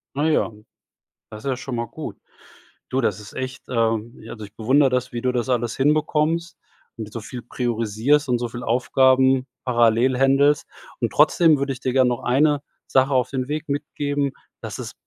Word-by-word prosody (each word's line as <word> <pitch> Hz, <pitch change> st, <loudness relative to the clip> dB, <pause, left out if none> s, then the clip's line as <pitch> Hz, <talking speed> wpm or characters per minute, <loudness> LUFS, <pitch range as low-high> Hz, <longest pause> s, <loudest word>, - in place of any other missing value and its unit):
Ah, 145 Hz, +2 st, 0 dB
ja, 155 Hz, -6 st, +1 dB, 0.8 s
das 105 Hz, 0 st, -10 dB
ist 140 Hz, -, -2 dB
ja 130 Hz, -, -1 dB
schon 130 Hz, 0 st, -5 dB
mal 120 Hz, 0 st, -2 dB
gut. -, -, -8 dB, 0.7 s
Du, 130 Hz, -, 0 dB
das 105 Hz, -3 st, 0 dB
ist 105 Hz, -, -12 dB
echt, 130 Hz, +1 st, -5 dB
ähm 115 Hz, -1 st, 0 dB
ja, 110 Hz, -, -9 dB
also, 110 Hz, -2 st, -8 dB
ich 100 Hz, +1 st, -13 dB
bewundere 135 Hz, +5 st, +3 dB
das, 125 Hz, 0 st, -1 dB
wie 120 Hz, -, -3 dB
du 125 Hz, -, 0 dB
das 125 Hz, 0 st, -2 dB
alles 120 Hz, -2 st, 0 dB
hinbekommst, 155 Hz, +3 st, +1 dB, 0.4 s
mit 110 Hz, -3 st, -7 dB
so 115 Hz, -, -5 dB
viel 120 Hz, +3 st, -8 dB
priorisierst 120 Hz, +4 st, 0 dB
und 125 Hz, -1 st, +2 dB
so 120 Hz, 0 st, -3 dB
viel 120 Hz, +1 st, -7 dB
Aufgaben 130 Hz, +2 st, +3 dB, 0.2 s
parallel 120 Hz, 0 st, +3 dB
händelst. 135 Hz, +3 st, +3 dB, 0.3 s
Und -, -, -1 dB
trotzdem 160 Hz, -4 st, +4 dB
würde 140 Hz, 0 st, -1 dB
ich 130 Hz, -, -9 dB
dir 130 Hz, -, -1 dB
gern 130 Hz, -1 st, +4 dB
noch 120 Hz, -1 st, -2 dB
eine 145 Hz, +3 st, +2 dB, 0.3 s
Sache 130 Hz, +1 st, +2 dB
auf 130 Hz, -1 st, +2 dB
den 130 Hz, -1 st, -3 dB
Weg 155 Hz, +1 st, -4 dB
mitgeben, 145 Hz, -1 st, -2 dB, 0.3 s
dass -, -, -6 dB
es -, -, -6 dB
130 Hz, 190 wpm, -22 LUFS, 120-140 Hz, 0.8 s, trotzdem